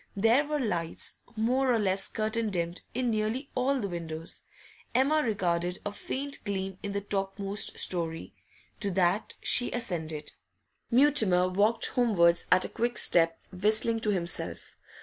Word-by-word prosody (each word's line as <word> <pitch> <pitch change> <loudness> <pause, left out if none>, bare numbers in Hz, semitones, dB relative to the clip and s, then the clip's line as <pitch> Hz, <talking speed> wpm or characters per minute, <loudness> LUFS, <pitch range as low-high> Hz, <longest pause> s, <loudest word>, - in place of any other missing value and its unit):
There 230 +8 +3
were 300 0 -1
lights, 175 -10 -2 0.2
more 250 +4 +1
or 235 - +3
less 195 -2 0
curtain 220 0 -2
dimmed, 170 -2 -3
in 250 -1 0
nearly 220 +6 -2
all 265 +2 0
the 205 - -2
windows. 165 -2 -6 0.5
Emma 285 +5 +3
regarded 180 - -1
a 205 - -2
faint 275 +6 -5
gleam 195 -2 -4
in 200 -1 -4
the 200 - -2
topmost 195 0 -2
storey. 165 -2 -1 0.5
To 200 - -1
that 185 +2 0
she 245 - +3
ascended. 160 -10 -3 0.6
Mutimer 235 -9 +4
walked 205 +5 +2
homewards 175 -9 +2
at 185 0 +4
a - - -5
quick 240 +1 -2
step, 165 -1 +4 0.2
whistling 215 +4 +2
to 220 - -1
himself. 175 -4 0
205 Hz, 145 wpm, -28 LUFS, 180-235 Hz, 0.6 s, Mutimer